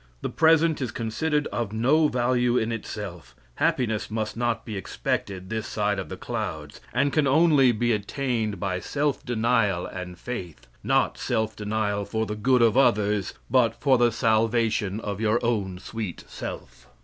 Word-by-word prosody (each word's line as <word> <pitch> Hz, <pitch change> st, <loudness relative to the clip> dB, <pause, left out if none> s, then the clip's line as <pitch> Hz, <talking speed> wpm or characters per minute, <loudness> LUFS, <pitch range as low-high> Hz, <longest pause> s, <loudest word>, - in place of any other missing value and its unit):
The -, -, -1 dB
present 160 Hz, -1 st, +4 dB
is 130 Hz, -, -1 dB
considered 145 Hz, +7 st, -1 dB
of 115 Hz, -4 st, -2 dB
no 135 Hz, +8 st, +3 dB
value 125 Hz, -1 st, +1 dB
in 110 Hz, 0 st, 0 dB
itself. 95 Hz, -, -6 dB, 0.2 s
Happiness 110 Hz, -4 st, 0 dB
must 110 Hz, 0 st, -3 dB
not 120 Hz, -1 st, -1 dB
be 110 Hz, -, -5 dB
expected 95 Hz, -, -3 dB
this 110 Hz, -1 st, -2 dB
side 105 Hz, -2 st, 0 dB
of 95 Hz, -, -6 dB
the -, -, -6 dB
clouds, 75 Hz, -2 st, -5 dB
and 140 Hz, -, +1 dB
can 150 Hz, -3 st, +3 dB
only 145 Hz, -3 st, +5 dB
be 120 Hz, +1 st, 0 dB
attained 110 Hz, -1 st, -1 dB
by 95 Hz, -2 st, -1 dB
self 145 Hz, +6 st, -1 dB
denial 115 Hz, -6 st, +1 dB
and 90 Hz, -1 st, -7 dB
faith; 90 Hz, -, -7 dB, 0.2 s
not -, -, +1 dB
self 110 Hz, 0 st, -1 dB
denial 105 Hz, -1 st, -1 dB
for 110 Hz, +1 st, -1 dB
the 105 Hz, -, -4 dB
good 125 Hz, +3 st, +3 dB
of 115 Hz, -2 st, +4 dB
others, 105 Hz, -6 st, +2 dB
but 120 Hz, -3 st, +2 dB
for 135 Hz, -4 st, +3 dB
the 120 Hz, -1 st, +4 dB
salvation 110 Hz, -2 st, +1 dB
of 105 Hz, -2 st, -4 dB
your 110 Hz, +1 st, +2 dB
own 100 Hz, -6 st, -1 dB
sweet 105 Hz, -1 st, -6 dB
self. -, -, -8 dB
110 Hz, 160 wpm, -25 LUFS, 105-125 Hz, 0.2 s, only